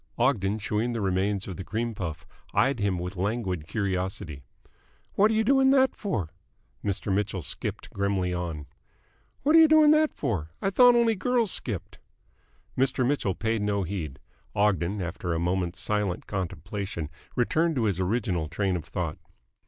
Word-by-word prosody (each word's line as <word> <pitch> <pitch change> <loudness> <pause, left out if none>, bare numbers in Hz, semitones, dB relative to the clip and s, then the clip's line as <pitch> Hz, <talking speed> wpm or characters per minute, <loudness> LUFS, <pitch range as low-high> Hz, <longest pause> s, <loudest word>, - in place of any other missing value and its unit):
Ogden, 110 -5 +2
chewing 110 +3 -1
the 115 - -2
remains 95 0 0
of 95 -4 -6
the - - -5
cream 115 +4 -2
puff, 80 -5 -5 0.3
eyed 135 -2 +3
him 100 -3 +1
with 90 +3 -5
languid 95 -4 -2
curiosity. 95 -7 -2 0.7
"What 210 +2 +4
are 220 - +1
you 220 - +3
doing 265 +3 +4
that 265 -1 +4
for?" 100 - -3 0.5
Mr. 100 0 -1
Mitchell 100 -3 -1
skipped - - -4
grimly 100 -2 0
on. 85 -4 -4 0.8
"What 305 +3 +4
are - - +9
you 320 - +8
doing 310 -1 +6
that 310 0 +4
for? 80 -9 -2
I 195 - 0
thought 245 +4 +7
only 235 -1 +4
girls 235 +1 +1
skipped." 95 -4 -3 0.8
Mr. 130 -1 +2
Mitchell 125 -10 0
paid 110 -1 -1
no 100 -1 0
heed. 80 -7 -4 0.4
Ogden, 100 -1 +1
after 85 0 -3
a - - -1
moment's 90 0 -1
silent 105 -4 -1
contemplation, 90 -2 -4 0.2
returned 160 +7 +2
to 125 - +1
his 100 -4 0
original 95 -4 0
train 95 +3 -1
of 85 - -4
thought. - - -4
100 Hz, 160 wpm, -27 LUFS, 90-125 Hz, 0.8 s, are